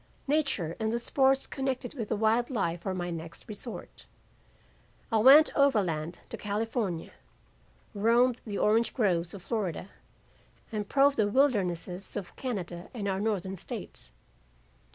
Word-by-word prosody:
Nature 275 - 0
and 220 0 0
the 235 - 0
sports 265 +3 +2
connected 265 -2 -3
with 230 -7 -5
a 220 - +1
wild 220 +3 +2
life 170 -9 -2
were 190 - -1
my 175 -1 -3
next 165 0 -8
resort. 220 +2 -9 1.0
I 225 - +3
went 275 +7 +8
overland 180 - +1
to - - -5
California, 210 -4 -2 0.8
roamed 235 +4 +3
the 205 -3 -4
orange 220 +2 +2
groves 180 -6 +1
of 190 - -10
Florida, 200 -5 -3 0.8
and 210 -2 -3
probed 280 0 +4
the 215 - +3
wildernesses 195 - 0
of 190 -4 -7
Canada 180 -8 -5
and 205 -4 -3
our 190 -1 0
Northern 195 -3 -1
states. 115 - -8
215 Hz, 135 wpm, -29 LUFS, 180-245 Hz, 1.0 s, went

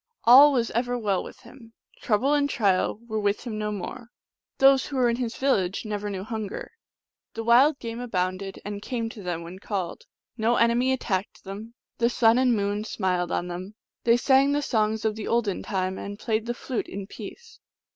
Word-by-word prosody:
All 270 +5 +9
was 240 -4 0
ever 245 +1 -1
well 205 -5 0
with - - -12
him; 230 -4 -15 0.3
trouble 250 +6 +2
and 285 -1 +2
trial 200 -3 +1
were 220 -1 -2
with 205 0 0
him 225 -4 -5
no 210 0 -2
more. 225 +4 -6 0.5
Those 270 0 +5
who 280 - -6
were 250 -2 +3
in 235 - -2
his 245 -2 -3
viL 270 0 +2
lage 190 +3 -3
never 210 -1 -3
knew 190 -2 -4
hunger; 220 -2 -5 0.6
the 225 - -3
wild 260 +6 +5
game 230 -2 -6
abounded, 190 -4 -3
and 205 0 -5
came 230 -1 -3
to 225 - -10
them 175 -3 -4
when 175 +3 -9
called; 200 - -4 0.3
no 230 +2 +2
enemy 235 +3 +3
attacked 205 -7 -2
them; 210 +4 -8 0.2
the 235 0 +3
sun 235 0 +4
and 255 -2 +3
moon 205 0 -1
smiled 180 -5 -1
on 175 - -1
them; 185 +4 -7 0.3
they 235 0 +5
sang 270 +2 +4
the 290 0 0
songs 220 -3 0
of 220 - +2
the 220 - -6
olden 225 -5 0
time, 190 -2 -2
and 200 0 -6
played 220 +1 -2
the 240 - -2
flute 250 0 -4
in 195 0 -6
peace. 455 - -11
225 Hz, 195 wpm, -26 LUFS, 200-245 Hz, 0.6 s, All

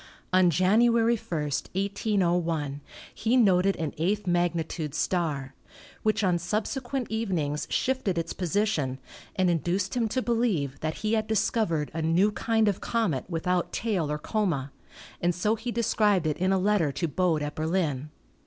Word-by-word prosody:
On 185 -1 +5
January 225 +7 +4
1, 225 - -12
1801, 175 -3 -1 0.3
he 235 +3 +1
noted 195 -4 +4
an 160 -3 -3
eighth 200 +5 0
magnitude 170 -3 -1
star, 145 -7 -1 0.5
which 215 0 +1
on 180 -2 +3
subse 210 +9 -2
quent 255 0 -3
evenings 175 -10 -1
shifted 255 -9 0
its 165 0 -2
position 180 -8 0 0.4
and 185 -2 +2
induced 175 +4 0
him 235 -2 +1
to 255 +4 -1
be 240 - -1
lieve 180 - 0
that 155 0 -2
he 215 - +1
had 215 -1 +1
discovered 210 -7 0
a 165 - -2
new 170 +6 +3
kind 225 0 +1
of 200 -2 0
comet 215 - 0
without 180 +1 -1
tail 190 -10 -1
or 150 - -1
coma, 150 -6 -1 0.5
and 175 0 +1
so 210 +5 +1
he 225 +2 -4
described 210 -6 +2
it 155 -1 0
in 185 +3 +1
a 195 - +3
letter 190 -6 +2
to 170 +5 -2
Bode 160 0 +1
at 145 0 -3
Berlin. 155 -4 -1
185 Hz, 160 wpm, -27 LUFS, 160-215 Hz, 0.5 s, On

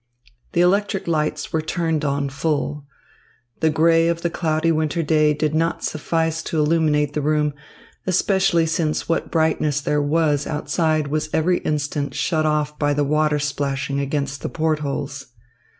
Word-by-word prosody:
The 170 - +3
electric 195 +2 +1
lights 155 -2 -1
were 160 - +1
turned 160 -1 -1
on 140 -1 0
full. 145 0 -2 0.7
The 160 - +3
grey 165 +1 +3
of 170 0 -1
the 170 - 0
cloudy 160 0 0
winter 155 +1 0
day 155 0 +3
did 150 0 -1
not 165 +1 0
suffice 160 +1 -1
to 160 - -3
illuminate 150 -2 +2
the 150 - -1
room, 150 0 +1 0.5
especially 185 -2 +2
since 160 -1 -1
what 165 - -1
brightness 155 -3 +1
there 145 +1 0
was 150 -1 +1
outside 155 0 0
was 155 +1 -1
every 175 +3 +2
instant 145 -1 -2
shut 155 -3 0
off 150 -1 -1
by 145 -1 +1
the 145 - +1
water 150 +1 +2
splashing 140 -1 -2
against 140 0 -2
the - - -3
port 160 -1 0
holes. 140 -1 -4
155 Hz, 155 wpm, -21 LUFS, 145-165 Hz, 0.7 s, The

